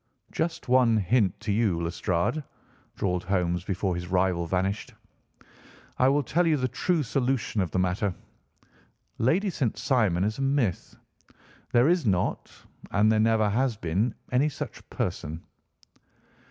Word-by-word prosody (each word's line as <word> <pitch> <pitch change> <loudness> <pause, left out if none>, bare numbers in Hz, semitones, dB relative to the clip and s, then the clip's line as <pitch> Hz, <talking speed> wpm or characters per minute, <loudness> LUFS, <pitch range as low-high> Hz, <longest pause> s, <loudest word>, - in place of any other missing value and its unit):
"Just 160 -1 -3
one 125 -3 +4
hint 100 -1 +1
to 105 - -2
you, 100 -5 +1
Lestrade," 85 - -1 0.5
drawled 90 -2 -1
Holmes 90 -2 0
before 95 0 -1
his 90 0 -4
rival 90 -2 +1
vanished; 95 +4 -2 1.0
"I 130 - +5
will 140 +2 +3
tell 170 +6 +1
you 155 -2 +3
the 130 -1 0
true 155 +6 0
solution 125 -4 0
of 90 - -1
the 95 - -3
matter. 95 +2 0 1.1
Lady 185 - +2
St. 130 -9 -1
Simon 105 -9 +1
is 110 +4 -1
a - - -2
myth. 135 - 0 0.8
There 120 +3 +4
is 175 0 +3
not, 90 -3 0 0.4
and 105 +2 +3
there 110 - +3
never 110 -1 +3
has 125 0 0
been, 100 +6 -1 0.2
any 135 +4 +3
such 145 - -8
person." 85 -3 -4
110 Hz, 140 wpm, -27 LUFS, 90-130 Hz, 1.1 s, I